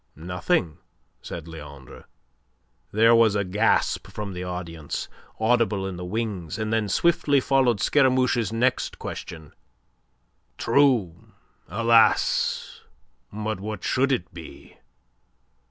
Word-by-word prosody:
"Nothing," 90 - -1 0.4
said 85 -1 -8
Leandre. 75 -5 -11 0.9
There 115 +2 +5
was 115 -3 +4
a 100 - +1
gasp 105 +4 +1
from 105 -2 -6
the 90 0 -5
audience, 85 -4 -5 0.3
audible 110 -3 +1
in 95 -1 -4
the 90 - -7
wings, 95 -4 -4
and 110 0 -2
then 110 -2 0
swiftly 145 - +2
followed 130 -5 +2
Scaramouche's 125 -3 +2
next 120 +3 0
question: 80 -3 -8 1.0
"True. 115 - +1 0.3
Alas! 115 +1 +2 0.5
But 110 -1 -4
what 105 -1 -6
should 135 +2 +1
it 90 -11 -2
be?" 85 -2 -12
105 Hz, 105 wpm, -24 LUFS, 90-115 Hz, 1.0 s, There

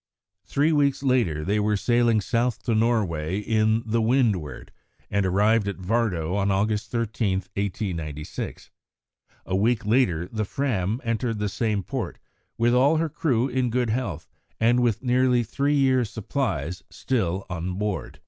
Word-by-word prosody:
Three 145 +3 +2
weeks 140 -3 +2
later 115 - +1
they 105 +2 +1
were 105 0 +1
sailing 120 0 +2
south 120 +3 -1
to 120 - 0
Norway 100 -8 +1
in 110 +1 +1
the 115 +1 0
Windward, 110 - 0 0.4
and 100 -2 +1
arrived 105 +3 +3
at 100 - -2
Vardo 95 -4 -1
on 100 -1 +1
August 105 +2 0
13, 115 -3 -1
1896. 90 -6 -5 0.7
A 95 - -2
week 110 +3 +1
later 100 -8 +2
the 110 +2 -3
Fram 110 -2 -1
entered 115 -1 -1
the 105 0 -1
same 105 -2 -1
port, - - -4 0.4
with 120 +1 +3
all 140 +6 +4
her 165 0 0
crew 130 -5 0
in 130 -1 0
good 120 -1 0
health, 110 - -3 0.3
and 120 +2 +3
with 120 -1 +1
nearly 125 -1 +3
three 140 +6 0
years' 130 -5 +2
supplies 100 - -3
still 95 -7 -1
on 90 0 -4
board. 105 0 -3
110 Hz, 150 wpm, -25 LUFS, 95-125 Hz, 0.7 s, all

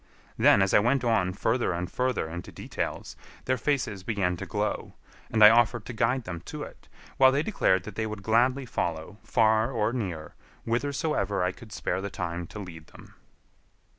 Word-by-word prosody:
Then, 100 - +5
as 95 - 0
I - - +7
went 120 +5 +2
on 110 -6 +2
further 110 +2 0
and 90 +1 -3
further 125 -5 -1
into 85 +2 -7
details, - - -5 0.3
their 130 - +2
faces 130 -7 -1
began 95 -3 -1
to - - -6
glow, - - -3 0.3
and 110 -1 +3
I 105 - +11
offered 120 -1 +3
to - - -6
guide 120 +3 +1
them 85 -5 -6
to - - -6
it, - - -12 0.3
while 130 0 +7
they 140 +3 +1
declared 95 - +1
that 110 - -8
they 110 +2 -2
would 105 -2 -7
gladly 125 +5 +2
follow, 85 -2 -3
far 110 +1 +2
or 115 -2 0
near, 90 -11 -4 0.3
whithersoever 140 - -1
I 90 - +1
could 110 +3 -14
spare 95 -3 -2
the 100 - -4
time 85 -2 -4
to - - -10
lead 85 -6 -9
them. - - -16
110 Hz, 185 wpm, -27 LUFS, 95-120 Hz, 0.3 s, I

